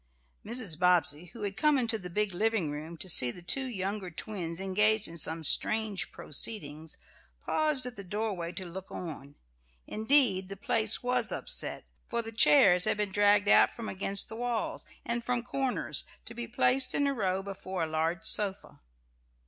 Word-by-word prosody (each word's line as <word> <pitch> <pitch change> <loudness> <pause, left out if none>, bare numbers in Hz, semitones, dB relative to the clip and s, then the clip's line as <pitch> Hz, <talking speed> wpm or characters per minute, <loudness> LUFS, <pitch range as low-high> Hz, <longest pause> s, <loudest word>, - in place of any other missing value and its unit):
Mrs. 215 -8 -1
Bobbsey, 175 -3 +2
who 210 +5 -10
had 200 -1 -3
come 300 +6 +3
into 230 -3 0
the 180 - -7
big 210 +2 -1
living 210 -5 0
room, 155 +3 -7
to 190 - -4
see 130 -8 +5
the 175 +8 -8
two 265 +9 0
younger 195 -3 -3
twins 170 -1 -5
engaged 210 +3 +2
in 165 - -10
some 160 0 -1
strange 215 +5 0
proceedings, 155 -3 -3 0.5
paused 305 -4 +1
at 250 -1 -6
the 200 - -8
doorway 195 -3 -3
to 185 - -6
look 185 +2 -8
on. 145 -4 -8 0.5
Indeed 220 -5 +2
the 195 - -7
place 220 +2 +1
was 250 +1 +1
upset, - - -1 0.2
for 235 0 -2
the 225 - -7
chairs 180 -2 +5
had - - +1
been 210 -2 -1
dragged 205 +1 +3
out - - +6
from 230 -2 -7
against 195 +1 +1
the 220 - -7
walls 240 -2 -2 0.2
and 235 0 -2
from 245 0 -1
corners 265 +1 -1 0.2
to 230 - -10
be 235 0 -5
placed 250 +3 +2
in 285 - +2
a 280 - +1
row 190 -5 -1
before 190 -2 -5
a - - -1
large 160 +2 -1
sofa. 200 -1 0
200 Hz, 175 wpm, -30 LUFS, 175-230 Hz, 0.5 s, out